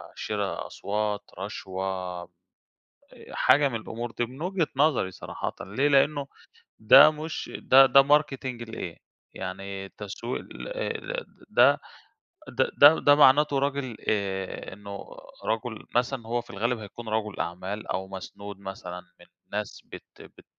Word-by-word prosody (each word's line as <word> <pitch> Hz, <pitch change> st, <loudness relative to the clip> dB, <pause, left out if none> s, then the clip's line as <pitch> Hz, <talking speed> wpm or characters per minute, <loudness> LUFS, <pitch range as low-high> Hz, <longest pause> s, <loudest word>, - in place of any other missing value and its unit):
شِرا -, -, -3 dB
أصوات، 105 Hz, 0 st, -3 dB
رشوة 95 Hz, -2 st, -4 dB, 0.7 s
أ -, -, -16 dB
حاجة 145 Hz, 0 st, +4 dB
من 120 Hz, -, -5 dB
الأمور 115 Hz, +1 st, -5 dB
دي 120 Hz, -, -1 dB
من 130 Hz, +5 st, -12 dB
وجهة 180 Hz, -2 st, 0 dB
نظري 140 Hz, -9 st, +2 dB
صراحةً 95 Hz, -, -5 dB
ليه؟ 130 Hz, +9 st, 0 dB
لإنه 145 Hz, 0 st, +3 dB, 0.5 s
ده 110 Hz, +7 st, +9 dB
مش 155 Hz, +1 st, -6 dB
ده 135 Hz, +1 st, +7 dB
ده 135 Hz, +1 st, +7 dB
marketing 135 Hz, -4 st, +1 dB
لإيه؟ 90 Hz, -6 st, -6 dB, 0.4 s
يعني 95 Hz, +1 st, -6 dB
تسويق 105 Hz, +5 st, -6 dB
لإيه -, -, -4 dB
ل -, -, -4 dB, 0.3 s
ده -, -, +5 dB, 0.7 s
ده -, -, 0 dB
ده 145 Hz, +3 st, +9 dB
ده 145 Hz, -, +6 dB
مَعناته 145 Hz, 0 st, +5 dB
راجل 135 Hz, -4 st, -2 dB
آآ 95 Hz, -3 st, -2 dB
إنه 100 Hz, 0 st, -8 dB, 0.4 s
رَجُل 110 Hz, 0 st, -3 dB
مثلًا 120 Hz, 0 st, 0 dB
هو 120 Hz, +1 st, 0 dB
في 120 Hz, -, -14 dB
الغالب 115 Hz, +5 st, -1 dB
هيكون 110 Hz, +2 st, -9 dB
رَجُل 110 Hz, -1 st, -2 dB
أعمال، 95 Hz, +5 st, -4 dB
أو 95 Hz, 0 st, -3 dB
مسنود 100 Hz, +1 st, -8 dB
مثلًا 95 Hz, -2 st, -7 dB, 0.2 s
من 85 Hz, -, -16 dB, 0.3 s
ناس -, -, -4 dB
بت -, -, -13 dB
بت -, -, -16 dB
115 Hz, 135 wpm, -27 LUFS, 100-140 Hz, 0.7 s, ده